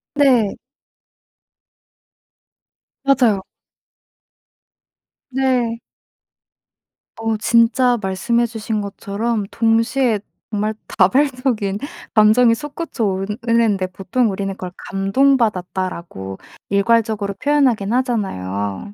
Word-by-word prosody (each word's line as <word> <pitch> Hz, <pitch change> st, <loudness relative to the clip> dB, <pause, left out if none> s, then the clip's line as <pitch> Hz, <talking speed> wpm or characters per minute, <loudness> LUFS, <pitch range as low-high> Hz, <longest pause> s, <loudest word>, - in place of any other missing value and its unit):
네. 255 Hz, -8 st, +3 dB, 2.5 s
맞아요. 245 Hz, -8 st, +3 dB, 1.9 s
네. 250 Hz, -3 st, 0 dB, 1.4 s
어 225 Hz, 0 st, -1 dB
진짜 235 Hz, +2 st, +3 dB
말씀해 215 Hz, +5 st, 0 dB
주신 220 Hz, -2 st, -3 dB
것처럼 205 Hz, +2 st, -3 dB
동시에 230 Hz, +1 st, +2 dB, 0.3 s
정말 215 Hz, 0 st, -1 dB, 0.2 s
다발적인 245 Hz, -1 st, +2 dB, 0.4 s
감정이 225 Hz, +2 st, +5 dB
솟구쳐 295 Hz, -1 st, -5 dB
오르는데 210 Hz, 0 st, 0 dB
보통 195 Hz, +6 st, -1 dB
우리는 195 Hz, 0 st, -3 dB
그걸 185 Hz, -1 st, -7 dB, 0.2 s
'감동받았다.'라고 190 Hz, -, 0 dB, 0.3 s
일괄적으로 210 Hz, 0 st, +1 dB
표현하긴 255 Hz, -5 st, +1 dB
하잖아요. 190 Hz, -, -2 dB
220 Hz, 195 characters per minute, -19 LUFS, 195-245 Hz, 2.5 s, 감정이